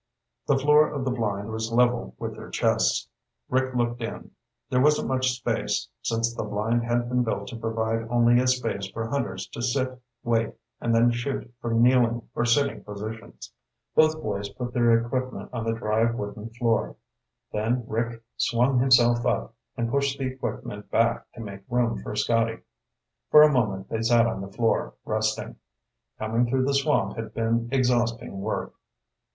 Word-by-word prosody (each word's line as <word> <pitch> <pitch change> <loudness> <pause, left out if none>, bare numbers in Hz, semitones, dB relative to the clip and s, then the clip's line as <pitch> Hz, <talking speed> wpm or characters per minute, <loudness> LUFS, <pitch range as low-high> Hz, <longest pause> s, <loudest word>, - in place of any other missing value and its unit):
The 140 - +4
floor 150 +2 +5
of 140 -3 -3
the 130 - 0
blind 105 -3 -2
was 110 +1 -3
level 120 0 +2
with - - -5
their - - -10
chests. - - +1 0.4
Rick 130 0 0
looked 120 0 0
in. 115 - -6 0.4
There 125 - +2
wasn't 150 +2 +3
much 130 -1 +2
space, 125 - -2
since 115 0 0
the - - -4
blind 110 +3 0
had 120 0 0
been 125 0 +1
built 105 -4 -2
to - - -7
provide 115 0 -2
only 120 0 +4
a 125 - +2
place 115 -6 0
for 115 - -4
hunters 95 -8 -2
to - - -7
sit, 130 +1 -1 0.2
wait, 115 -1 0 0.2
and 115 -1 +1
then 120 +1 +5
shoot 120 +1 -3
from 115 0 +2
kneeling 120 -2 +3
or 120 - 0
sitting 140 +4 +1
positions. 105 +2 -8 0.4
Both 155 0 +4
boys 100 -1 -3
put 125 -1 -6
their 115 -2 +3
equipment 130 +1 -4
on 115 -2 -3
the 115 - +1
dry 110 +1 +1
wooden 105 -1 -5
floor. 115 -1 0 0.6
Then 115 +4 0
Rick 115 +1 -2
swung 125 +2 +2
himself 120 -2 +5
up 115 - -1 0.2
and 115 -1 -1
pushed 140 0 +1
the 135 - -2
equipment 120 -5 -5
back 115 0 +1
to - - -9
make 100 -3 -7
room 120 -1 +1
for 105 - -6
Scotty. 115 +1 +1 0.7
For 150 - +9
a 150 -1 +5
moment 100 -6 0
they 110 - -2
sat 115 +1 +4
on 110 -4 -2
the 100 0 -7
floor, 115 +2 0
resting. 110 0 -1 0.6
Coming 115 +3 0
through 130 +1 +1
the 140 - +1
swamp 140 -9 +1
had 115 -1 -6
been 115 +1 0
exhausting 120 -5 0
work. - - -3
120 Hz, 170 wpm, -26 LUFS, 115-125 Hz, 0.7 s, For